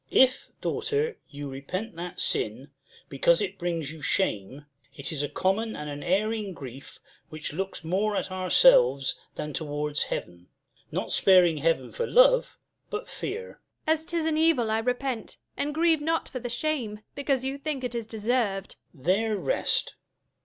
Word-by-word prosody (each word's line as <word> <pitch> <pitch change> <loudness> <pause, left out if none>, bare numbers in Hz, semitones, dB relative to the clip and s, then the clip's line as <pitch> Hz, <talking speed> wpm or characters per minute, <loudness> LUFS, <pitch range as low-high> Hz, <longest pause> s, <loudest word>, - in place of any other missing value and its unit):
Duke. - - +3
If, 260 - -14
daughter, 450 +1 -1
you 145 -1 -6
repent 160 +11 -5
that 175 +1 -6
sin, 125 +7 0 0.4
because 165 +5 +3
It 195 -1 -3
brings 165 -4 -2
you 155 -1 -10
shame, 135 - -1 0.3
it 140 - -3
is 150 -3 -1
a 145 - -1
common 220 +4 0
and 150 0 -5
An 145 0 -6
erring 205 +2 0
grief, 135 -1 -10 0.3
which 155 -1 -6
looks 190 +1 -4
more 200 +6 0
at 190 - -2
ourselves 185 - +5 0.2
Than 150 0 -4
towards 150 0 -2
Heaven; 85 0 -5 0.4
not - - -3
sparing 180 -4 +5
Heaven 165 +3 +1
for 480 -1 -2
love, - - +5 0.3
But 425 - -4
fear. 450 +5 -6 0.2
Jul. 315 - +5
As 320 0 -4
'tis 335 -1 -1
an 315 -1 +1
evil 295 -9 +3
I 220 - +2
repent, 250 0 -2 0.2
and 290 - -1
grieve 320 0 +3
not 325 +2 0
for 255 - -5
The 245 0 -5
shame, 240 -5 -1
because 275 -2 0
you 270 +1 -2
think 280 -2 -3
it 245 -1 -3
is 230 -2 -3
deserv'd. 220 -3 -1 0.2
Duke. 130 - -18
There 210 +4 +2
rest. - - +1
210 Hz, 165 wpm, -27 LUFS, -, 0.4 s, ourselves